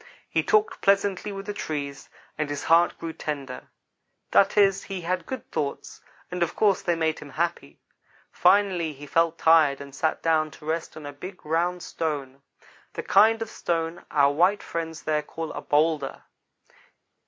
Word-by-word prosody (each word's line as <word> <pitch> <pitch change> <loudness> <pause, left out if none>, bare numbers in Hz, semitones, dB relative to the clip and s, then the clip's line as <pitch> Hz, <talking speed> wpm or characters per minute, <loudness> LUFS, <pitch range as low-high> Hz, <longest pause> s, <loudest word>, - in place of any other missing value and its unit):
He - - +1
talked 430 +1 +1
pleasantly 200 0 +2
with 195 0 -7
the 205 - -4
trees, 145 -7 -5 0.3
and 155 -1 -2
his 145 0 -4
heart 170 +1 +4
grew 165 -1 -5
tender. 140 -5 -5 0.6
That 195 +1 +4
is, 195 -2 +4
he 195 -2 -5
had 180 0 -2
good 260 -3 -6
thoughts; 140 -2 -4 0.3
and 180 0 -4
of 170 - 0
course 205 -3 +3
they 175 - 0
made 160 -1 0
him 150 - -10
happy. 160 - -3 0.5
Finally 185 -6 +3
he 145 +1 -11
felt 165 +2 +1
tired 160 -4 +5
and 140 -1 -10
sat 155 +3 -1
down 155 -1 +2
to 150 - -15
rest 160 +1 -3
on 155 - -9
a 145 - -6
big, 185 +6 -10
round 175 +3 0
stone 140 -4 -4 0.5
the - - -5
kind 225 +1 +4
of 225 - -10
stone 165 0 -2
our 140 -1 +3
white 180 +7 +3
friend 165 -1 -4
there 155 -1 +1
calls 160 +1 -6
a - - -5
bowlder. 150 -2 0
165 Hz, 170 wpm, -25 LUFS, 150-185 Hz, 0.6 s, tired